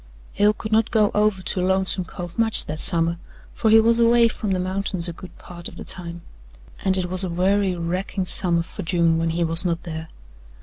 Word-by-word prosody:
Hale 205 +1 +3
could 215 0 -7
not 220 +1 +2
go 215 -2 +2
over 210 -3 +1
to 180 - -1
Lonesome 190 0 +1
Cove 175 0 -8
much 225 -1 +2
that 155 +1 -6
summer, 170 -2 +2 0.3
for 220 - 0
he 220 +1 +7
was 230 +1 +3
away 235 0 +5
from 210 -1 -5
the 190 -1 0
mountains 185 -1 -2
a 170 - -5
good 180 +2 -13
part 175 -1 -9
of - - -12
the - - -9
time, 170 -2 -8 0.6
and 190 -1 +2
it 185 - -1
was 185 +1 +1
a 185 - -2
weary, 190 +2 +1
racking 180 +3 -3
summer 175 -2 +2
for - - -9
June 170 -1 +1
when 165 0 0
he 170 +1 -1
was 165 +1 +2
not 170 -2 -2
there. 160 -1 -6
185 Hz, 215 wpm, -22 LUFS, 170-205 Hz, 0.6 s, he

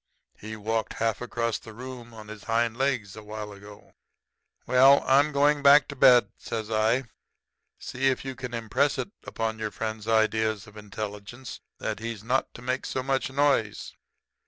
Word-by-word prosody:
He 110 +1 -7
walked 110 +1 -2
half 115 -1 -1
across 115 -2 -2
the 110 -2 -12
room 125 -1 -9
on 110 -2 -11
his 110 -1 -10
hind 115 0 +1
legs 125 -6 -1
a 110 - -9
while 105 0 -7
ago.' 100 +1 -14 0.7
"'Well, 135 +2 +6
I'm 140 +3 +4
going 145 +1 +3
back 140 +1 +7
to 140 - -6
bed,' 125 -2 +6
says 110 -1 -5
I. 110 +4 +2 0.7
'See 130 +1 -2
if 135 0 0
you 135 - -4
can 125 -1 -6
impress 125 +5 0
it 195 - -4
upon 110 -1 -3
your 110 -1 -2
friend's 110 0 -5
ideas 110 -1 +1
of 105 -1 -16
intelligence 105 +3 -7 0.2
that - - -4
he's 115 -2 -5
not 125 +4 0
to 120 - -10
make 130 +1 -2
so 130 - -2
much 135 0 0
noise.' 135 -6 0
115 Hz, 170 wpm, -27 LUFS, 110-130 Hz, 0.7 s, back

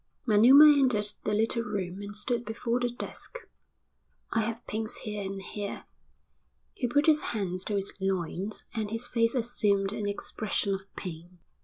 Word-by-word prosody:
Manuma 245 +7 +8
entered 210 -6 +2
the 210 - 0
little 225 +2 +1
room 195 -4 -4
and 205 0 -7
stood 235 +2 0
before 230 +2 -2
the 245 0 0
desk. 245 - -6 0.9
"I 225 - +1
have 230 +1 -4
pains 220 +2 -4
here 210 -1 -5
and 195 0 -4
here." 200 +1 -5 0.9
He 250 - -2
put 290 +5 +2
his 305 -2 +5
hands 185 -4 -3
to 210 - -1
his 195 -1 0
loins 190 +2 -2
and 220 -3 -2
his 225 +3 -3
face 230 0 +1
assumed 210 -5 +1
an 205 -1 -2
expression 200 0 -1
of 195 0 -5
pain. 175 0 -8
210 Hz, 160 wpm, -29 LUFS, 195-235 Hz, 0.9 s, Manuma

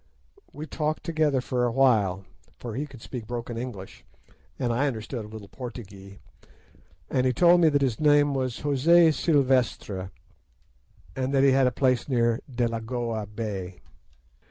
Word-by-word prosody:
We 150 - -7
talked 155 0 -3
together 155 -5 +1
for 125 0 -1
a 120 - +1
while, 105 -8 +2 0.3
for 120 -3 -7
he 145 +6 -3
could 130 -5 -14
speak 120 -5 -7
broken 120 -1 -5
English, 115 -6 -7 0.5
and 120 -2 -1
I 135 +5 +1
understood 115 -2 -5
a - - -10
little 105 -1 -10
Portugee, 100 -6 -10 0.9
and 130 0 +1
he - - +3
told 175 +5 +5
me 165 - +6
that 145 -2 +1
his 125 -5 -1
name 145 -1 +4
was 130 -3 -2
José 160 +4 +4
Silvestre, 130 - 0 1.1
and 130 0 -2
that 135 - +4
he 140 - +5
had 130 -1 +4
a - - +1
place 130 +2 0
near 120 -2 +2
Delagoa 115 -2 -2
Bay. 100 -4 -6
125 Hz, 155 wpm, -26 LUFS, 110-140 Hz, 1.1 s, me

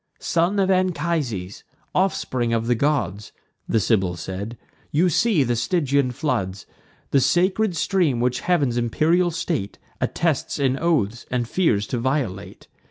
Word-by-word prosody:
"Son 175 +4 0
of 195 -1 +2
Anchises, 160 - -1 0.3
offspring 130 -10 0
of 115 0 0
the 120 - +2
gods," 110 - -1 0.4
The 110 - +3
Sibyl 95 -4 +1
said, 95 +7 -6 0.3
"you 170 +5 +3
see 185 -2 +3
the 120 -1 0
Stygian 140 +1 +1
floods, 100 -8 -2 0.5
The 140 - +4
sacred 185 - +2
stream 170 -12 +1
which 125 +1 0
heav'n's 145 -9 +1
imperial 160 +9 +2
state 165 - -3 0.2
Attests 160 -5 0
in 135 -2 +1
oaths, 120 -10 0
and 125 -2 -1
fears 115 - +1
to 120 - -3
violate. 125 -7 -3
135 Hz, 135 wpm, -23 LUFS, 115-170 Hz, 0.5 s, The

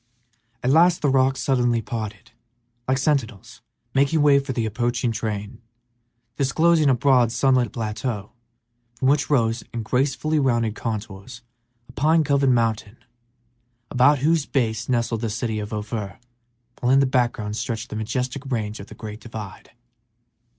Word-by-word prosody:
At 125 - +2
last 170 +3 +4
the 145 - +3
rocks 135 -1 +2
suddenly 120 -2 +2
parted, 110 -3 -6 0.6
like 130 0 +2
sentinels 130 - -2 0.3
making 140 +3 +2
way 140 -1 +6
for 140 -1 -4
the 120 -3 -1
approaching 120 +2 -1
train, 110 0 -4 0.8
disclosing 155 +3 +3
a 130 - +4
broad, 125 -2 +3
sunlit 125 -3 +2
plateau, 105 -1 -4 0.6
from 130 +3 +1
which 140 0 +2
rose, 115 -5 +1
in 115 -1 -4
gracefully 140 +6 0
rounded 120 -5 +1
contours, 110 +1 -6 0.4
a - - -14
pine 155 +5 +2
covered 140 -2 +2
mountain, 115 -2 0 0.9
about 130 +4 +4
whose 160 -2 +2
base 115 -3 -1
nestled 115 -2 0
the - - -2
little 105 -1 -3
city 110 -2 -2
of 105 0 -6
Ophir, 105 -2 -4 0.6
while 125 - +1
in 135 - +6
the 140 - +4
background 120 -5 0
stretched 115 0 -4
the - - -4
majestic 125 +5 -3
range 110 -3 -2
of 100 - -9
the - - -12
great 105 -1 -8
divide. 105 -3 -9
120 Hz, 150 wpm, -23 LUFS, 110-135 Hz, 0.9 s, way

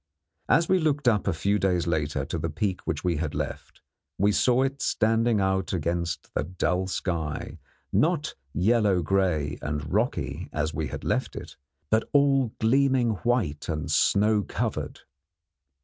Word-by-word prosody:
As 165 +4 +4
we 185 0 +3
looked 145 -4 0
up 105 -4 +2
a - - +3
few 100 +5 0
days 90 -3 +1
later 75 -5 -1
to 85 - -4
the 80 +2 -2
peak 95 +5 -2
which 75 - -2
we 90 -3 +1
had 75 -1 -3
left, - - -5 0.4
we 100 +2 +3
saw 125 +4 +3
it 135 +1 -2
standing 115 0 +2
out 95 -2 0
against 85 -1 -2
the - - 0
dull 90 +2 -1
sky, 85 -5 -3 0.3
not 155 -1 +1 0.2
yellow 100 +1 +2
grey 80 -5 0
and 75 0 -4
rocky - - -1
as 80 +1 -2
we - - -2
had - - -7
left - - -1
it, - - -8 0.4
but 110 +1 +2
all 135 -4 +3
gleaming 130 +1 +3
white 105 - 0
and 75 -2 -2
snow 105 +1 +3
covered. - - -3
95 Hz, 155 wpm, -26 LUFS, 80-120 Hz, 0.4 s, As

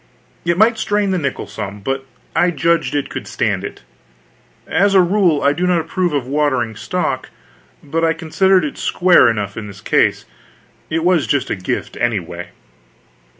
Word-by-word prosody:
It 170 0 +1
might 220 +2 +4
strain 205 -2 0
the 185 - +1
nickel 140 -4 -3
some, 105 0 -6
but 135 +6 -3 0.3
I 180 - +4
judged 170 -2 +1
it 145 - 0
could - - -6
stand - - -1
it. - - -8 0.8
As 200 +1 +2
a - - +8
rule, 180 -4 +3
I 140 +1 +4
do 180 +4 -1
not 180 -2 +3
approve 175 +2 -1
of 140 -4 -1
watering 130 -5 0
stock, - - -2 0.5
but 160 +3 -2
I 165 0 +3
considered 180 +3 +2
it 145 - -6
square 175 -8 +4
enough 105 -3 -3
in 110 -2 -5
this 100 -1 -11
case, - - +2
for - - -31 0.7
it 165 - 0
was 175 -4 +3
just 140 - 0
a - - +1
gift, 90 -2 -4
anyway. - - -2
160 Hz, 175 wpm, -18 LUFS, 135-180 Hz, 0.8 s, a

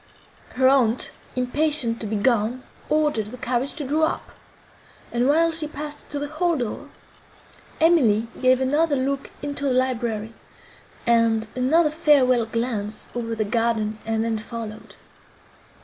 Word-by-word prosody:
Her 260 0 +4
aunt, 255 -3 +2 0.2
impatient 255 -1 +2
to 220 - -3
be 215 - -2
gone, 235 +3 +1 0.3
ordered 300 -9 +1
the 250 +4 -8
carriage 250 +2 -1
to 300 -2 -4
draw 310 +4 +2
up; - - -5 0.8
and, 240 +1 +1
while 330 +3 +4
she 320 -2 -2
passed 300 0 -8
to 290 - -3
the 290 +1 -3
hall 325 +2 0
door, 240 -5 -4 0.9
Emily 245 -10 +4
gave 255 0 +4
another 295 +3 +2
look 275 +1 -2
into 285 0 -4
the 270 - +2
library, 235 -4 -1 0.7
and 230 -1 +3
another 300 +5 +3
farewell 270 -7 +3
glance 225 -3 -3
over 230 -1 -3
the 215 -1 -1
garden, 220 -1 0
and 225 0 -1
then 225 -1 -1
followed. 220 -1 -8
255 Hz, 140 wpm, -23 LUFS, 225-290 Hz, 0.9 s, Her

